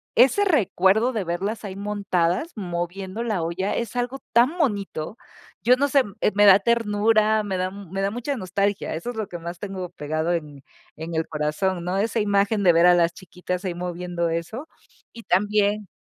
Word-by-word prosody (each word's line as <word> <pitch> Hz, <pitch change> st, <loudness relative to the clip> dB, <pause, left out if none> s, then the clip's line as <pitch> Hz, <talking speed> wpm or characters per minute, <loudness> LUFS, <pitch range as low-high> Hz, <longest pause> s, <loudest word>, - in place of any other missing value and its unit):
ese 265 Hz, -, +5 dB
recuerdo 225 Hz, -, +3 dB
de 215 Hz, -4 st, -1 dB
verlas 190 Hz, +6 st, -3 dB
ahí 190 Hz, -2 st, -6 dB
montadas, 200 Hz, -, -1 dB
moviendo 185 Hz, +2 st, -4 dB
la 215 Hz, -7 st, -1 dB
olla, 180 Hz, +4 st, -2 dB
es 235 Hz, 0 st, -3 dB
algo 245 Hz, +2 st, -2 dB
tan 250 Hz, +9 st, +4 dB
bonito. 205 Hz, -, -2 dB, 0.4 s
Yo 245 Hz, +2 st, +5 dB
no 285 Hz, +2 st, +2 dB
sé, 280 Hz, 0 st, +4 dB
m 205 Hz, -6 st, -7 dB
eh, -, -, +3 dB
me 205 Hz, 0 st, +5 dB
da 195 Hz, -1 st, +8 dB
ternura, 215 Hz, 0 st, +2 dB
me 200 Hz, -2 st, -3 dB
da 185 Hz, 0 st, -1 dB
me 195 Hz, -1 st, -6 dB
da 195 Hz, +1 st, 0 dB
mucha 245 Hz, +5 st, -3 dB
nostalgia, 200 Hz, -1 st, -1 dB
eso 170 Hz, +10 st, -4 dB
es -, -, -11 dB
lo 215 Hz, -2 st, -2 dB
que 175 Hz, -, -6 dB
más 170 Hz, +1 st, -7 dB
tengo 190 Hz, -2 st, -5 dB
pegado 155 Hz, +3 st, -2 dB
en 150 Hz, -5 st, -5 dB, 0.3 s
en 160 Hz, +2 st, -6 dB
el 160 Hz, 0 st, -1 dB
corazón, 155 Hz, +4 st, -1 dB
¿no?, 180 Hz, +2 st, -1 dB
esa 220 Hz, +3 st, 0 dB
imagen 205 Hz, 0 st, +1 dB
de 175 Hz, -2 st, +6 dB
ver 170 Hz, +1 st, +5 dB
a 180 Hz, -, +7 dB
las 170 Hz, -1 st, +2 dB
chiquitas 180 Hz, 0 st, -6 dB
ahí 180 Hz, -2 st, -2 dB
moviendo 175 Hz, -1 st, -3 dB
eso 170 Hz, -, -4 dB, 0.5 s
y 230 Hz, -, -11 dB
también 205 Hz, 0 st, +1 dB
195 Hz, 190 wpm, -24 LUFS, 175-220 Hz, 0.5 s, da